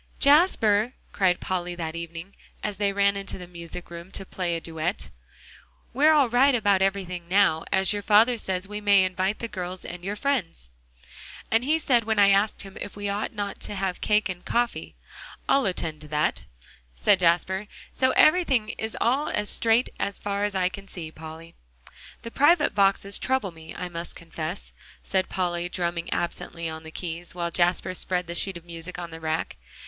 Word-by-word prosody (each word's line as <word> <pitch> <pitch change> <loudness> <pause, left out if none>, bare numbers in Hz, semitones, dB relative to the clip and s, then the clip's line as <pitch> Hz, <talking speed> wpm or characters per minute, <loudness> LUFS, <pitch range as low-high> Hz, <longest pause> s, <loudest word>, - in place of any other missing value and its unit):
"Jasper," 255 - +4 0.2
cried 185 -3 +2
Polly 180 -1 -2
that 165 -2 -4
evening, 170 +3 -7 0.3
as 205 -2 -3
they 200 0 +1
ran 200 0 +2
into 195 0 -5
the 180 - -8
music 170 0 -7
room 170 +1 -8
to 195 - -4
play 180 -2 -2
a - - -2
duet, 160 -1 -3 0.8
"we're 295 +5 +5
all 295 -4 +5
right 255 +3 +4
about 205 -4 +3
everything 185 -3 -1
now, 180 -4 +3
as 190 +2 +3
your 205 - -2
father 215 +4 +5
says 190 -1 -2
we 210 +1 -6
may 200 -2 +5
invite 185 +2 0
the 230 - -4
girls 185 -3 -5
and 175 0 -7
your 200 +2 -3
friends." 200 - -2 0.8
"And 225 +2 +3
he 305 +4 +2
said 245 -7 +2
when 220 -1 0
I 200 -1 +6
asked 200 +2 +2
him 195 -1 -11
if 205 - -6
we 205 0 -3
ought 200 +1 -2
not 205 -2 -4
to 205 - -5
have 190 -2 -2
cake 210 0 +2
and 180 -2 -6
coffee, 240 0 -1 0.5
'I'll 275 -4 +3
attend 165 -4 -3
to 150 - -10
that,'" 150 0 0 0.5
said 125 - +3
Jasper, 185 +3 +2 0.3
"so 260 - +2
everything 295 -9 +4
is 220 0 -4
all 270 +6 +1
straight 225 +3 +2
as 200 - -1
far 200 0 -2
as 205 -1 -3
I 185 -1 +2
can 195 +2 -8
see, 165 -5 -7
Polly." 160 +1 -10 0.7
"The 230 - -7
private 295 +4 +4
boxes 200 0 +2
trouble 260 -7 0
me, 160 -1 -11
I 180 - -4
must 170 0 -6
confess," 165 +2 -6 0.3
said 190 -1 0
Polly, 175 -1 -1
drumming 170 -2 -3
absently 170 -1 -3
on 160 0 -6
the 160 - -10
keys, 170 +1 -5
while 170 -1 -2
Jasper 175 +2 +1
spread 180 0 -1
the 170 - -6
sheet 190 +1 0
of 170 - -14
music 170 +1 -7
on 170 -1 -6
the 160 - -8
rack. 160 0 -2
190 Hz, 185 wpm, -26 LUFS, 170-210 Hz, 0.8 s, I